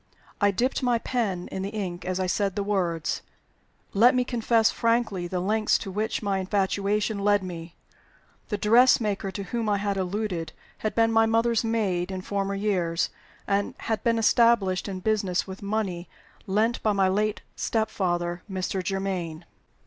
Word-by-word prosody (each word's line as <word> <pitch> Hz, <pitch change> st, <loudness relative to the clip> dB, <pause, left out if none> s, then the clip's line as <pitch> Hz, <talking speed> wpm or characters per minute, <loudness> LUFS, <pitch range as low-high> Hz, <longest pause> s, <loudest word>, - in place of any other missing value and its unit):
I 205 Hz, -, +5 dB
dipped 245 Hz, +9 st, 0 dB
my 245 Hz, -2 st, +2 dB
pen 220 Hz, -7 st, -2 dB
in 190 Hz, -, -3 dB
the 195 Hz, -, -3 dB
ink 190 Hz, -5 st, -4 dB
as 185 Hz, 0 st, -2 dB
I 185 Hz, -, +1 dB
said 195 Hz, +1 st, 0 dB
the 205 Hz, -, -1 dB
words. 180 Hz, -6 st, -1 dB, 0.7 s
Let 240 Hz, +6 st, +6 dB
me 250 Hz, -, +3 dB
confess 230 Hz, -2 st, +2 dB
frankly 230 Hz, -6 st, 0 dB
the 180 Hz, +1 st, -2 dB
lengths 215 Hz, +4 st, +2 dB
to 195 Hz, -, -6 dB
which 215 Hz, +3 st, -2 dB
my 200 Hz, -2 st, 0 dB
infatuation 200 Hz, +2 st, 0 dB
led 205 Hz, 0 st, +3 dB
me. 170 Hz, -2 st, -7 dB, 0.7 s
The 210 Hz, -, -1 dB
dressmaker 210 Hz, -2 st, +4 dB
to 200 Hz, +1 st, -5 dB
whom 225 Hz, +3 st, -2 dB
I 205 Hz, -, +2 dB
had 200 Hz, 0 st, -1 dB
alluded 185 Hz, -4 st, -2 dB, 0.3 s
had 215 Hz, -, -2 dB
been 225 Hz, 0 st, +3 dB
my 225 Hz, 0 st, +4 dB
mother's 230 Hz, +1 st, +2 dB
maid 200 Hz, -6 st, 0 dB
in 190 Hz, -1 st, -4 dB
former 200 Hz, +1 st, -2 dB
years, 180 Hz, -5 st, 0 dB, 0.3 s
and 200 Hz, 0 st, 0 dB
had 220 Hz, -2 st, -3 dB
been 230 Hz, -1 st, +2 dB
established 225 Hz, -5 st, +3 dB
in 190 Hz, -2 st, -5 dB
business 200 Hz, -4 st, 0 dB
with 190 Hz, 0 st, -9 dB
money 200 Hz, -4 st, -2 dB, 0.4 s
lent 215 Hz, +4 st, +1 dB
by 215 Hz, -, +2 dB
my 195 Hz, -1 st, +3 dB
late 210 Hz, +3 st, 0 dB
step 220 Hz, -1 st, -1 dB
father, 175 Hz, -2 st, -1 dB
Mr. 190 Hz, 0 st, -2 dB
Germaine. 180 Hz, -3 st, -3 dB
200 Hz, 165 wpm, -26 LUFS, 185-220 Hz, 0.7 s, Let